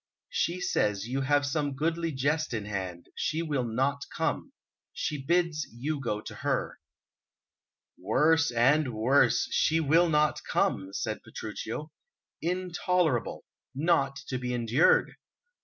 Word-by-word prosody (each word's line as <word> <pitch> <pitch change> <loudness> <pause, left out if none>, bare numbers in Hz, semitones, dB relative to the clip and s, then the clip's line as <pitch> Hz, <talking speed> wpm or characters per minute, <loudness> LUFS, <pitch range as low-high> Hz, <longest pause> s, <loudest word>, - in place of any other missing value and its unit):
"She 175 +2 0
says 105 - 0
you 135 +3 -1
have 145 +1 +2
some 145 -1 -1
goodly 165 +3 -1
jest 145 0 0
in 105 -2 -3
hand; 95 -4 -5
she 160 +1 -1
will 145 -5 -1
not 135 +5 0
come. - - -2 0.4
She 145 -3 -3
bids 170 -1 +1
you 145 +6 -3
go 105 -5 -2
to - - -8
her." - - -2 1.2
"Worse 160 +2 +3
and 130 +2 +2
worse, 125 +6 +3
'she 160 +1 +2
will 165 +3 +4
not 150 -1 +2
come!'" 95 0 0
said - - -3
Petruchio. 155 +1 -6 0.5
"Intolerable, 180 -5 0 0.3
not 140 -2 +2
to 130 - -2
be 125 0 -2
endured! 120 +6 +3
145 Hz, 125 wpm, -29 LUFS, 125-160 Hz, 1.2 s, will